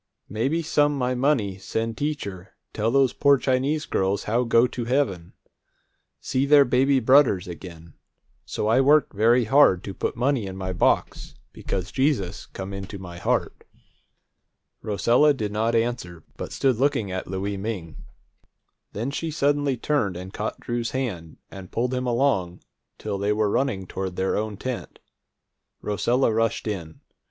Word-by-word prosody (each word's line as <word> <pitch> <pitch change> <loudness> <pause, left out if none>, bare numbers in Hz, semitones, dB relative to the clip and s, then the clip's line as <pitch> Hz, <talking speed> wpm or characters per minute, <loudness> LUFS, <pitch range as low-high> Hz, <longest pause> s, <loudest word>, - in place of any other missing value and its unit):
Maybe 135 - -1
some 145 -2 +2
my 125 -1 0
money 125 -8 0
send 115 +3 -3
teacher 100 -12 -5 0.2
tell 110 +1 0
those 135 0 +3
poor 140 -1 +4
Chinese 135 +4 0
girls 95 +1 0
how 115 +4 +1
go 115 +1 +4
to 120 -1 -4
heaven, 115 -10 -1 0.9
see 130 - -1
their 145 -1 +7
baby 130 +2 +3
brudders 130 -7 +4
again. 85 -2 -10 0.5
So 105 - -3
I 115 +4 +4
work 145 +1 +4
very 115 +4 +4
hard 110 -6 +4
to 100 - -6
put - - -3
money 125 -3 0
in 95 0 -7
my 95 -1 -3
box, 90 - 0 0.2
because 95 0 -4
Jesus 130 -9 -1
come 95 +1 -7
into 100 +1 -6
my 90 -2 -9
heart." - - -1 1.2
Rosella 120 +7 +3
did 105 -5 -3
not 110 +2 0
answer, 115 -8 -2
but - - -6
stood 130 -4 +1
looking 120 -7 0
at 95 0 -4
Louie 95 +2 -3
Ming. 95 -5 -5 1.0
Then 115 +7 -3
she 165 +3 -3
suddenly 145 -3 +1
turned 110 -11 0
and 95 +2 -8
caught 105 - -4
Drew's 120 -1 -3
hand, 90 -12 -4
and 95 -2 -10
pulled 125 +2 -1
him 125 0 -2
along 115 -9 0 0.3
till 100 -2 -4
they 100 +1 +1
were 105 -1 +1
running 120 -7 0
toward 95 0 -5
their 95 +1 0
own 105 -1 -3
tent. 130 +2 -5 0.8
Rosella 115 +4 +1
rushed 115 0 0
in. 90 -7 -5
115 Hz, 155 wpm, -24 LUFS, 95-135 Hz, 1.2 s, their